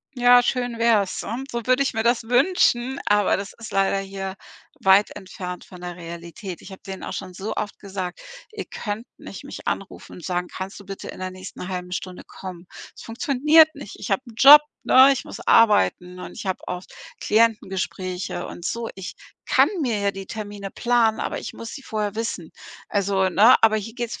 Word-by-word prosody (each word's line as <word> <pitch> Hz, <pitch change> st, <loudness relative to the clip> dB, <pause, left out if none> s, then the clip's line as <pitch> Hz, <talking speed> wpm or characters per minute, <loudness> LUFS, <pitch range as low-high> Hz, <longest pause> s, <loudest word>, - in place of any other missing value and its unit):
Ja, 245 Hz, 0 st, +6 dB
schön 245 Hz, -2 st, -1 dB
wär's, 220 Hz, -5 st, +2 dB
und 260 Hz, +5 st, -5 dB
so 235 Hz, -2 st, -4 dB
würde 255 Hz, +2 st, +4 dB
ich 275 Hz, -, -1 dB
mir 225 Hz, -, -1 dB
das 235 Hz, 0 st, +2 dB
wünschen, 250 Hz, 0 st, +2 dB
aber 205 Hz, -1 st, +3 dB
das 200 Hz, +1 st, -6 dB
ist 230 Hz, -, -9 dB
leider 195 Hz, 0 st, +2 dB
hier 195 Hz, -1 st, -5 dB, 0.5 s
weit 195 Hz, +2 st, +5 dB
entfernt 180 Hz, -2 st, -7 dB
von 180 Hz, -, -13 dB
der 175 Hz, -1 st, -6 dB
Realität. 170 Hz, +3 st, -8 dB
Ich 195 Hz, -, -11 dB
hab 190 Hz, -, -12 dB
denen 190 Hz, -1 st, -7 dB
auch -, -, -5 dB
schon 185 Hz, -2 st, -6 dB
so 200 Hz, +4 st, -4 dB
oft 205 Hz, -, -4 dB
gesagt: 190 Hz, -3 st, -6 dB, 0.3 s
„Ihr 430 Hz, -3 st, -6 dB
könnt 215 Hz, +2 st, -5 dB
nicht -, -, -10 dB
mich -, -, -9 dB
anrufen -, -, -5 dB
und 175 Hz, -, -11 dB
sagen: 180 Hz, -1 st, -2 dB
‚Kannst 190 Hz, +2 st, -7 dB
du 200 Hz, -, -14 dB
bitte 195 Hz, -1 st, -7 dB
in -, -, -9 dB
der 185 Hz, 0 st, -3 dB
nächsten 185 Hz, 0 st, -9 dB
halben 180 Hz, -1 st, -5 dB
Stunde 185 Hz, 0 st, -5 dB
kommen?‘“ 180 Hz, -2 st, -9 dB, 0.3 s
Es -, -, -11 dB
funktioniert 285 Hz, +7 st, +4 dB
nicht. 280 Hz, -9 st, -10 dB
Ich -, -, -6 dB
habe -, -, +1 dB
'n 235 Hz, -, -12 dB
Job, 285 Hz, +5 st, +10 dB, 0.2 s
ne, 265 Hz, +2 st, +7 dB
ich 270 Hz, -, -3 dB
muss 210 Hz, -, -9 dB
arbeiten 180 Hz, -, +3 dB
und -, -, -8 dB
ich -, -, -8 dB
habe 190 Hz, -, -3 dB
auch 180 Hz, 0 st, -4 dB, 0.4 s
Klientengespräche 190 Hz, -4 st, 0 dB
und 175 Hz, -, -9 dB
so. 230 Hz, +3 st, -3 dB
Ich 190 Hz, -1 st, -7 dB, 0.3 s
kann -, -, +4 dB
mir 230 Hz, -6 st, 0 dB
ja 200 Hz, 0 st, +1 dB
die 195 Hz, -1 st, -8 dB
Termine 205 Hz, -2 st, -6 dB
planen, 235 Hz, -1 st, +2 dB
aber -, -, -3 dB
ich -, -, -6 dB
muss 230 Hz, -, -8 dB
sie 275 Hz, -, -9 dB
vorher 210 Hz, -4 st, -3 dB
wissen. 215 Hz, -7 st, -4 dB, 0.4 s
Also, 195 Hz, -2 st, +1 dB
ne? 215 Hz, +7 st, +6 dB
Aber 220 Hz, -1 st, +5 dB
hier 220 Hz, +1 st, -5 dB
geht's 240 Hz, -2 st, -4 dB
205 Hz, 200 wpm, -23 LUFS, 185-235 Hz, 0.5 s, Job